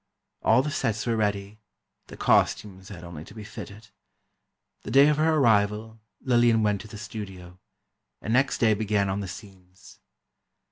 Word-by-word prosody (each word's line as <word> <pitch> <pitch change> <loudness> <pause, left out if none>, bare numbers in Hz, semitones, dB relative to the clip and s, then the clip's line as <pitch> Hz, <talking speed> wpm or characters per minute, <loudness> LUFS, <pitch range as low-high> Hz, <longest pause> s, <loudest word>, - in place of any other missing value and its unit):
All 115 +4 +4
the 150 - -3
sets 110 -7 -1
were 115 -2 0
ready, 105 -1 -2 0.5
the - - -11
costumes 95 -2 +1
had 90 -5 -10
only 85 -3 -9
to 105 - -15
be 110 - -8
fitted. 105 +1 -10 0.9
The - - -8
day 140 +2 +6
of 150 - +1
her 160 +1 +2
arrival, 110 -3 +1 0.2
Lillian 120 -3 +3
went 105 -2 +1
to 110 - -11
the 110 0 -10
studio, 95 -5 -9 0.6
and 110 - -3
next 135 +2 +2
day 110 -2 +3
began 105 -2 0
on 95 +1 -2
the 100 - -5
scenes. 95 -1 -13
105 Hz, 160 wpm, -26 LUFS, 100-115 Hz, 0.9 s, day